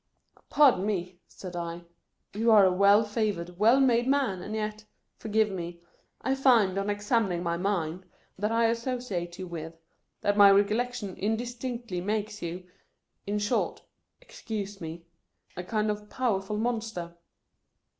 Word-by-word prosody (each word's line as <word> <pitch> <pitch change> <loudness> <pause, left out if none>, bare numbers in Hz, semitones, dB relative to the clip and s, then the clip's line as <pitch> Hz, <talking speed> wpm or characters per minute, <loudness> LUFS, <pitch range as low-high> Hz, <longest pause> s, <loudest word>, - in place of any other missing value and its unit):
" - - -29
Pardon 270 -10 +5
me," 180 -3 -3
said 180 -2 -9
I, 170 0 -5 0.3
" - - -50
you 225 +3 +1
are 210 -3 +7
a 185 - +4
well 200 +3 +5
favored, 205 -5 -2
well 230 +6 +5
made 245 -2 +3
man, 265 -10 +1
and 215 +4 -5
yet 215 0 -3 0.2
— - - -51
forgive 220 -1 +1
me 170 -2 -6 0.2
— - - -37
I 265 - +1
find, 235 -8 +3
on 200 +1 -2
examining 205 -3 0
my 170 -1 0
mind, 180 -2 -2 0.3
that 210 +3 -1
I 230 0 +3
asso 235 +3 -1
ciate 175 -8 -5
you 185 - -5
with 165 -2 -7 0.2
— - - -50
that 205 - +1
my 200 -1 +9
recollection 210 +1 +1
indis 225 +4 -2
tinctly 235 -7 -4
makes 210 +1 -2
you, 175 +2 -5 0.6
in 205 +1 -1
short 205 0 -1 0.2
— - - -51
excuse 205 - -6
me 165 +1 -7 0.3
— - - -37
a 180 - -5
kind 215 +2 0
of 210 0 -7
powerful 210 -5 -1
monster." 220 -7 -3
205 Hz, 170 wpm, -28 LUFS, 180-225 Hz, 0.6 s, my